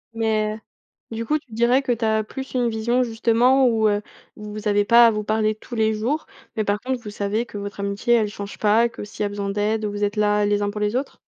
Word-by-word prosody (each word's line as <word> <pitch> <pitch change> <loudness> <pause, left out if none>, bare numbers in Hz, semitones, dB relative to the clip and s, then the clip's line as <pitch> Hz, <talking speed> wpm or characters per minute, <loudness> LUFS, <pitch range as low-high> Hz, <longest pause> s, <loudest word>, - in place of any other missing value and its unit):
Mais 215 -1 0
heu, 220 - -8 0.6
du 230 - -3
coup, 305 +5 +1
tu 285 -5 -17
dirais 235 +4 +2
que 255 - -1
tu 235 -1 -1
as 220 -1 +2
plus 265 +5 -8
une 245 -1 +2
vision 235 +3 +1
justement 240 +3 +3
où, 220 -2 +2
heu, 205 0 +1 0.3
où 210 0 -9
vous 215 0 -5
avez 205 0 +3
pas 235 +3 +7
à 230 - +4
vous 210 0 -3
parler 215 0 +1
tous 220 +3 -10
les 220 -1 +2
jours, 240 +9 -2 0.3
mais 215 - 0
par 205 0 0
contre, 255 +2 -3
vous 210 - -7
savez 205 +3 -2
que 220 - -9
votre 200 0 -7
amitié, 200 +4 +1
elle 220 -2 +2
change 200 -1 -8
pas, 220 +3 +3
que 230 - -9
s'il 205 - -9
y - - +2
a - - -1
besoin 200 -1 -4
d'aide, 210 +2 -1
vous 205 0 -3
êtes 205 +1 0
là 210 0 +2
les 205 0 +1
uns 205 - -1
pour 210 - -6
les 210 +2 0
autres? 270 +3 -3
220 Hz, 265 wpm, -22 LUFS, 205-235 Hz, 0.6 s, pas